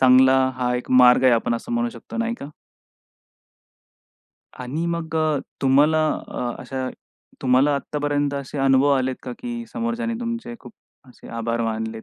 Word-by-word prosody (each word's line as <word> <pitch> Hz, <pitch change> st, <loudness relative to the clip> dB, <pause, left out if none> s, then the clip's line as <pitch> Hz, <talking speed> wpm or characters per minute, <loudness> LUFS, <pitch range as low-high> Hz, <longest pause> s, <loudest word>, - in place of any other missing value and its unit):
चांगला 130 Hz, +1 st, +6 dB, 0.2 s
हा 125 Hz, -1 st, 0 dB
एक 125 Hz, -, -7 dB
मार्ग 125 Hz, 0 st, +6 dB
आहे, 130 Hz, -, +6 dB
आपण 115 Hz, 0 st, +1 dB
असं 235 Hz, -, -5 dB
म्हणू 240 Hz, 0 st, 0 dB
शकतो -, -, -10 dB
नाही 230 Hz, 0 st, -1 dB
का? 140 Hz, -, -7 dB, 2.1 s
आणि 135 Hz, +7 st, -3 dB
मग 170 Hz, -1 st, -3 dB
अ, 155 Hz, -2 st, +1 dB, 0.2 s
तुम्हाला 150 Hz, +4 st, +4 dB, 0.2 s
अ, 125 Hz, -, -3 dB
अशा 130 Hz, +1 st, -4 dB, 0.5 s
तुम्हाला 135 Hz, +3 st, +3 dB
आत्तापर्यंत 145 Hz, 0 st, -1 dB
असे 140 Hz, +1 st, -5 dB
अनुभव 135 Hz, +1 st, +4 dB
आलेत 130 Hz, 0 st, -1 dB
का, 125 Hz, -, -6 dB
की 240 Hz, -1 st, -5 dB
समोरच्याने 235 Hz, -1 st, -2 dB
तुमचे 235 Hz, 0 st, -4 dB
खूप -, -, -13 dB, 0.4 s
असे 125 Hz, -, -15 dB
आभार 115 Hz, 0 st, -2 dB
मानलेत 110 Hz, 0 st, -3 dB
135 Hz, 150 wpm, -22 LUFS, 125-160 Hz, 2.1 s, चांगला